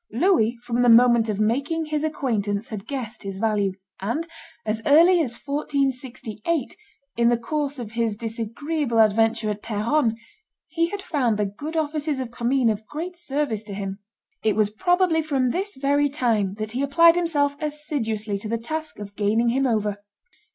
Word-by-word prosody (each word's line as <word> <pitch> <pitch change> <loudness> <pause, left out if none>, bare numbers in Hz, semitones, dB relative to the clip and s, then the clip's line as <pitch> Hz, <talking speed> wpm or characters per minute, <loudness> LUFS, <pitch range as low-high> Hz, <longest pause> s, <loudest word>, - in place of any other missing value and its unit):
Louis, 240 - +2
from 240 0 0
the 245 - +5
moment 235 -1 +6
of 210 -1 -2
making 275 +9 0
his 305 0 -2
acquaintance, 225 -7 -1
had 210 -4 -7
guessed 245 -5 -5
his 195 -2 -5
value; 205 -2 +1 0.3
and 235 +12 -2 0.4
as 220 +1 -1
early 335 +4 +6
as 240 -6 -2
1468, 270 -2 -2 0.4
in 235 0 +4
the 240 - +3
course 285 +4 -2
of 235 -4 -6
his 230 -2 0
disagreeable 230 +5 -3
adventure 220 0 +3
at 210 0 -6
Peronne, 225 +3 +1 0.5
he 335 +1 +1
had 405 0 -5
found 245 -8 0
the 210 - +1
good 290 +12 -5
offices 300 -2 -1
of 250 -3 -4
Commynes 240 0 +2
of 215 0 -6
great 340 +4 -5
service 290 -9 -2
to 200 -2 -6
him. 195 0 -5 0.4
It 215 - +2
was 210 -1 +2
probably 355 - +2
from 270 -5 0
this 390 +6 -3
very 285 +2 +2
time 225 -8 0
that 215 0 -4
he 250 +4 -2
applied 335 +4 +5
himself 295 -5 +1
assiduously 225 -9 -2
to 215 - -5
the 230 - 0
task 310 +7 -5
of 205 -1 -9
gaining 220 +3 +2
him 265 +3 +2
over. 210 -3 0
240 Hz, 170 wpm, -24 LUFS, 215-295 Hz, 0.5 s, moment